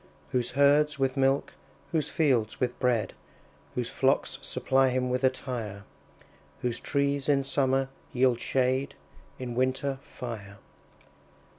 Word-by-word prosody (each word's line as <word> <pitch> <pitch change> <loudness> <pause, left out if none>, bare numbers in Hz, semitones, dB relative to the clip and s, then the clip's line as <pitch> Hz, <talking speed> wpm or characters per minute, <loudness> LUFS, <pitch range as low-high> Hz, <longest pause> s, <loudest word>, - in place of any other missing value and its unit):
Whose 125 -2 0
herds 145 +2 +4
with 135 -1 +1
milk, 135 0 +2 0.4
whose 155 -3 0
fields 125 -9 +1
with 125 -1 -1
bread, 115 -6 +1 0.6
Whose - - -2
flocks - - +1
supply 135 0 +2
him 125 0 0
with 125 +1 -1
attire; 120 -6 -2 0.8
Whose 120 -2 0
trees 140 0 0
in 140 -1 +3
summer 135 -1 +1 0.2
yield 125 -1 +3
shade, 130 +2 0 0.4
In 125 -2 -5
winter, 130 +2 0
fire. 110 -8 -8
130 Hz, 120 wpm, -28 LUFS, 125-140 Hz, 0.8 s, herds